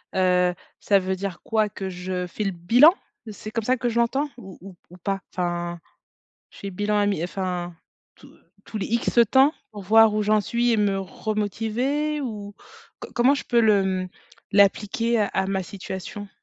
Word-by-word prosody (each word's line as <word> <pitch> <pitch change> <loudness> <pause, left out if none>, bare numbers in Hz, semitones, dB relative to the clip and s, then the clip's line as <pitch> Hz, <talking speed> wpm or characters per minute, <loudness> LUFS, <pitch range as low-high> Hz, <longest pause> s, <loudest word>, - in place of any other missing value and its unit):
heu, 180 -1 +3 0.3
ça 200 -1 +3
veut 190 0 -2
dire 190 -2 -5
quoi 215 -1 +1
que 195 -1 -6
je 180 0 -4
fais 210 +4 -4
le 195 - 0
bilan? 235 - +6 0.4
C'est 215 +1 -9
comme 230 0 -2
ça 255 - +3
que 245 0 -1
je 235 0 0
l'entends 270 +5 +1
ou 190 -6 -11
ou 195 -1 -11
ou 180 - -14
pas? 195 +2 -3
Enfin, 175 -1 -3 0.7
je - - -17
fais 200 - -7
le 185 - -9
bilan 210 +1 0
a 205 - +2
mi 185 -5 0
enfin, 180 -2 -4 0.4
tous - - -18 0.3
tous 215 - -6
les - - -3
X 235 +1 0
temps 270 +3 +5 0.2
pour 205 - -8
voir 220 +2 +6
où 215 - +1
j'en 215 +1 +3
suis 240 +2 0
et - - +3
me 200 -2 +1
remotiver 225 +9 -2
ou 210 -6 -6 0.5
co - - -8
comment 255 +3 +4
je 285 - -4
peux 235 -1 +2
le 210 -3 +4 0.2
mmh, - - -8 0.4
l'appliquer 210 +3 +2
à 205 - +2
à 190 - -1
ma 195 -1 -1
situation? 195 +2 -7
205 Hz, 195 wpm, -24 LUFS, 190-230 Hz, 0.7 s, bilan